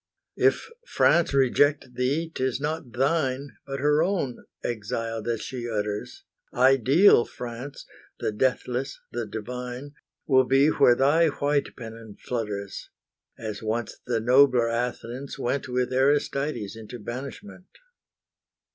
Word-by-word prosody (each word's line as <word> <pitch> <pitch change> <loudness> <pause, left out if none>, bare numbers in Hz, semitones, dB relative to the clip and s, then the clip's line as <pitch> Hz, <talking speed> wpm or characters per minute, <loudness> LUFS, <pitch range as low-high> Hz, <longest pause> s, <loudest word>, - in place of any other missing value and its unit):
If - - +3 0.2
France 170 - +3
reject 140 0 +2
thee, 140 +7 -1
'tis 130 -1 -1
not 150 -3 -3
thine, 135 +1 0 0.2
But 135 -1 -4
her 150 +1 +3
own, 170 -9 -1 0.2
exile 115 0 -3
that 115 0 -2
she 120 -3 -5
utters; 105 - -3 0.3
Ideal 135 - +5
France, 125 +4 -8 0.3
the - - -1
deathless, 130 +3 -1
the 120 -2 -3
divine, 125 +5 -6 0.3
Will 130 -2 +4
be 135 +3 +4
where 120 -5 +5
thy 150 +6 +4
white 145 -1 0
pennon 115 -3 -10
flutters, 105 -5 -4 0.5
As 110 -2 -6
once 110 +1 -3
the 120 -2 +1
nobler 125 0 +5
Athens 120 +2 -3
went 135 +3 -2
With 125 0 -1
Aristides 135 -4 +1
into 115 +2 -9
banishment. 135 - -8
125 Hz, 120 wpm, -26 LUFS, 115-140 Hz, 0.5 s, Ideal